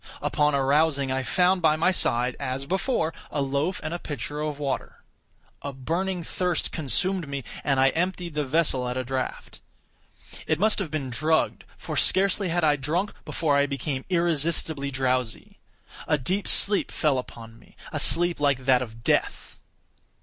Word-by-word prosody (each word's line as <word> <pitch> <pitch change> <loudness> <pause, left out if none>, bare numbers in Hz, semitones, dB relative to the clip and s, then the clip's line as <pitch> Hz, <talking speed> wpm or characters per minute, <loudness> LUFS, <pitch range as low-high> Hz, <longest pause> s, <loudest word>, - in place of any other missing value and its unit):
Upon 150 -1 +1
arousing, 140 0 +2
I 130 0 0
found 180 +8 +2
by 155 -2 +4
my 165 +4 +2
side, 125 -8 +2
as 135 0 -3
before, 190 - -1 0.2
a 145 - -3
loaf 140 +7 -1
and 155 +2 -4
a 175 - -3
pitcher 145 -1 -5
of 150 -1 -3
water. 140 -3 -4 0.6
A 140 - -5
burning 170 +7 -2
thirst 180 0 -2
consumed 170 +4 -1
me, 140 -1 -4 0.2
and 135 -2 +1
I 135 +1 +5
emptied 175 +2 -2
the 150 0 -1
vessel 135 -3 +1
at 125 - -3
a 130 - -1
draught. 130 +1 -5 0.9
It 155 - +1
must 215 +5 +2
have 190 -6 -3
been 140 -4 -4
drugged—for 155 +6 -1
scarcely 195 0 +3
had 175 0 0
I 150 -1 +3
drunk, 165 +9 -2
before 155 -3 0
I 140 0 +3
became 140 -1 -3
irresistibly 165 -4 0
drowsy. 130 -3 -2 0.5
A 150 - +2
deep 185 +9 -2
sleep 200 0 +5
fell 145 -5 +1
upon 115 -2 -10
me—a - - -9
sleep 175 0 +4
like 140 -3 +1
that 130 -2 +4
of 115 -2 -8
death. - - -1
150 Hz, 160 wpm, -25 LUFS, 135-170 Hz, 0.9 s, I